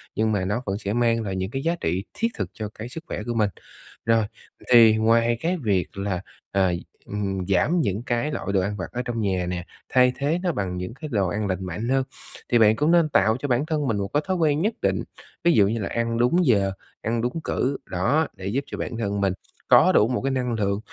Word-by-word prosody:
nhưng 110 0 +1
mà 95 -3 0
nó 105 +6 -1
vẫn 95 0 -1
sẽ 100 -1 -3
mang 115 -1 +2
lại 95 -2 -3
những 95 +1 -2
cái 135 +1 -3
giá 170 +1 +1
trị 90 +4 -1
thiết 225 +3 0
thực - - -2
cho 105 -2 -5
cái 110 +3 -7
sức 160 +5 -8
khỏe - - -4
của 120 - -3
mình. 105 -3 +2 0.6
Rồi, 115 -1 +3 0.5
thì 115 -2 +8
ngoài 115 +1 +3
cái 180 +2 0
việc 100 -3 0
là, 100 -2 -2 0.3
ờ, 95 -2 +2 0.3
ừm, 95 -3 -3
giảm 145 - +2
những 100 -1 -1
cái 120 +5 -1
loại - - -4
đồ 95 - +3
ăn 100 +2 -2
vặt 90 - -3
ở 125 - -2
trong 115 -2 -2
nhà 95 -3 0
nè, 90 0 -4 0.2
thay 125 0 +5
thế 150 +5 0
nó 180 - +2
bằng 95 - -3
những 90 +5 -5
cái 145 +3 -8
đồ 100 -3 +2
ăn 105 +3 -2
lành 95 0 -2
mạnh 105 +7 -4
hơn, 135 0 +2 0.5
thì 120 - +4
bạn 110 0 +6
cũng 150 +6 +2
nên 170 -3 +4
tạo 110 -1 +3
cho 145 - -3
bản 125 +3 +1
thân 150 -3 -1
mình 110 -3 0
một 100 0 -1
cái 150 +1 +2
thói 185 -1 0
quen 155 -2 +2
nhất 215 +3 +1
định, - - +1 0.4
ví 170 - +5
dụ 100 -2 +5
như 115 +2 -1
là 100 - -2
ăn 115 0 -1
đúng 165 +9 +3
giờ, 100 -6 +3 0.3
ăn 115 +1 -1
đúng 125 +7 -2
cử, 135 +2 -1
đó, 140 - +1
để 95 - -6
giúp 130 +7 -1
cho - - -6
bản 115 - -4
thân 100 -3 -1
mình 95 -2 +2 0.4
có - - +7
đủ 105 - +4
một 125 - -1
cái 135 +1 0
năng 125 -2 -1
lượng, 100 -2 0
115 Hz, 250 wpm, -24 LUFS, 100-135 Hz, 0.6 s, thì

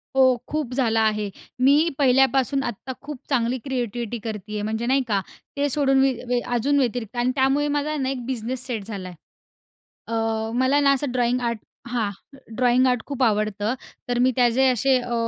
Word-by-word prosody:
हो. 260 -2 +5
खूप 295 -5 -3
झाला 225 -4 +2
आहे. 215 -2 +1 0.3
मी 285 +6 +5
पहिल्यापासून 270 0 +3
आत्ता 240 +1 -5
खूप 290 -1 -7
चांगली 250 -1 +1
क्रिएटिविटी 240 -3 -3
करती 210 -2 -6
आहे. 210 - -2
म्हणजे 220 +2 -2
नाही 270 +2 +3
का, 200 -3 +1 0.4
ते 285 0 +1
सोडून 270 -1 +2
मी 270 0 +4 0.2
वे 245 0 +1 0.2
अजून 280 +5 +2
व्यतिरिक्त 245 -3 -2
आणि 245 +1 +2
त्यामुळे 275 +2 +2
माझा 295 +1 -1
ना 265 -1 -1
एक 255 -3 -4
बिझनेस 250 0 -3
सेट 230 -6 -3
झालाय. 190 -4 -6 0.9
अ, - - -8 0.4
मला 260 +3 +3
ना 280 -1 +4
असं 275 -1 -1
ड्रॉइंग 245 0 +1
आर्ट 235 -2 -1 0.3
हां 230 -4 0 0.5
ड्रॉइंग 250 +1 +3
आर्ट 250 -2 +1
खूप 275 -2 -2
आवडतं. 215 0 +1 0.4
तर 245 0 +1
मी 255 +1 +4
त्याचे 250 +1 +3
असे 255 +2 +3
अ, 245 -1 -4
250 Hz, 175 wpm, -23 LUFS, 230-270 Hz, 0.9 s, हो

